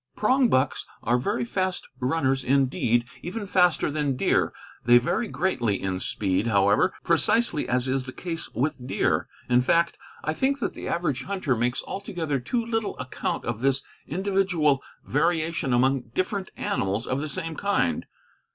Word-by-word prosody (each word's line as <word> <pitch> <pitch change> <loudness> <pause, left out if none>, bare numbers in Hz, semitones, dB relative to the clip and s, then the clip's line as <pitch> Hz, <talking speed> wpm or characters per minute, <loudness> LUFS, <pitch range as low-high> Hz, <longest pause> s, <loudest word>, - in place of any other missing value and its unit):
Prongbucks 215 - +2 0.2
are 120 +2 +2
very 205 - -1
fast 185 -5 -2
runners 135 0 +1
indeed, 125 -3 +2 0.2
even 205 +4 -4
faster 180 -5 +3
than 145 -3 0
deer. - - +2 0.3
They 120 0 +7
vary 175 - 0
greatly 120 - 0
in 95 -1 -2
speed, 95 +2 0
however, 100 - +3
precisely 170 +1 +2
as 125 +1 +1
is 130 0 0
the 130 - -5
case 165 +3 -5
with 125 0 -1
deer; - - +1 0.2
in 125 0 +4
fact, 170 +6 +2 0.2
I 155 - 0
think 270 - +1
that - - -2
the - - -7
average 160 -7 -1
hunter 185 -9 0
makes 120 +2 0
altogether 170 -7 -3
too 230 - -1
little 225 -2 -2
account 125 - -3
of 115 -2 -2
this 135 +1 +1 0.2
individual 180 -5 +1 0.2
variation 160 -2 0
among 125 0 +2
different 190 +1 -1
animals 115 - -1
of 130 +2 -1
the 155 - -3
same 165 -1 -3
kind. 200 +4 0
145 Hz, 150 wpm, -26 LUFS, 125-185 Hz, 0.3 s, They